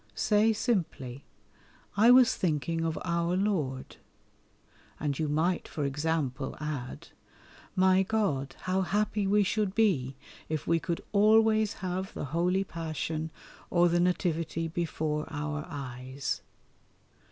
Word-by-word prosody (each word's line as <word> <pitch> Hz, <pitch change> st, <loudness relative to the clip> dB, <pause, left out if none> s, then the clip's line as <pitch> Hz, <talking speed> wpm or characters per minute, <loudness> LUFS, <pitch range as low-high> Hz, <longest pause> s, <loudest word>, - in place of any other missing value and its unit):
Say 215 Hz, -, +3 dB
simply, 165 Hz, -, -2 dB, 0.7 s
"I 220 Hz, +4 st, +6 dB
was 250 Hz, -1 st, +7 dB
thinking 165 Hz, -1 st, -1 dB
of 165 Hz, -1 st, -1 dB
Our 170 Hz, +1 st, 0 dB
Lord," 155 Hz, -11 st, -1 dB, 1.0 s
and 145 Hz, -2 st, -2 dB
you 155 Hz, -2 st, 0 dB
might, 165 Hz, +4 st, 0 dB
for 150 Hz, -, -3 dB
example, 140 Hz, -2 st, -1 dB
add, 150 Hz, -5 st, -5 dB, 0.7 s
"My 185 Hz, 0 st, +5 dB
God, 185 Hz, -10 st, -1 dB
how 185 Hz, +1 st, 0 dB
happy 205 Hz, +2 st, 0 dB
we 205 Hz, +1 st, +4 dB
should 205 Hz, 0 st, 0 dB
be 150 Hz, -, +2 dB, 0.3 s
if 155 Hz, -2 st, -2 dB
we 165 Hz, 0 st, +2 dB
could 170 Hz, 0 st, -3 dB
always 215 Hz, 0 st, +4 dB
have 185 Hz, +1 st, -3 dB
the -, -, -3 dB
Holy 175 Hz, +6 st, +1 dB
Passion 160 Hz, -2 st, -4 dB, 0.4 s
or 175 Hz, 0 st, +4 dB
the 175 Hz, +1 st, +2 dB
Nativity 165 Hz, -2 st, 0 dB
before 155 Hz, -2 st, -2 dB
our 150 Hz, 0 st, -3 dB
eyes." 130 Hz, -2 st, -4 dB
170 Hz, 120 wpm, -29 LUFS, 150-195 Hz, 1.0 s, was